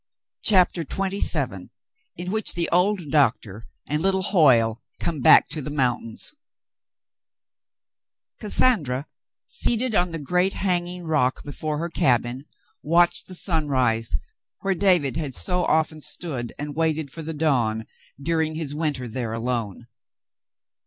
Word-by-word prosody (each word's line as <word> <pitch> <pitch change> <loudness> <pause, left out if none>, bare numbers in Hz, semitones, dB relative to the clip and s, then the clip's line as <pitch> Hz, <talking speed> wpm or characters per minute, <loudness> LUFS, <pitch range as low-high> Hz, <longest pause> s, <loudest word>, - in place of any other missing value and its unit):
CHAPTER 185 -4 +3
XXVII 195 +5 0 0.5
IN 180 +1 -4
WHICH 220 +1 +1
THE 170 -1 +1
OLD 180 -3 +1
DOCTOR 115 -8 +1 0.3
AND 150 +2 -1
LITTLE 190 +1 +1
HOYLE 125 - +3 0.2
COME 165 -3 -2
BACK - - +7
TO 155 - -4
THE 145 - -5
MOUNTAINS 125 - -2 2.1
Cassandra, 170 - +2 0.4
seated 240 0 0
on 180 -3 +2
the 165 - -5
great 180 +6 0
hanging 180 -1 -2
rock 150 -6 0
before 150 +1 -4
her 170 +3 -3
cabin, 125 -2 0 0.4
watched 170 +3 +3
the 185 - -6
sunrise 130 - 0 0.5
where 195 - 0
David 175 -8 +2
had 145 -6 -3
so 180 -1 +2
often 155 0 0
stood 135 -8 -4
and 145 0 -6
waited 160 -3 0
for 165 - -6
the 160 0 -6
dawn 120 -8 0 0.3
during 160 +1 -1
his 155 -3 -4
winter 150 -5 -2
there 115 -1 -4
alone. 115 -2 -3
155 Hz, 125 wpm, -23 LUFS, 130-175 Hz, 2.1 s, BACK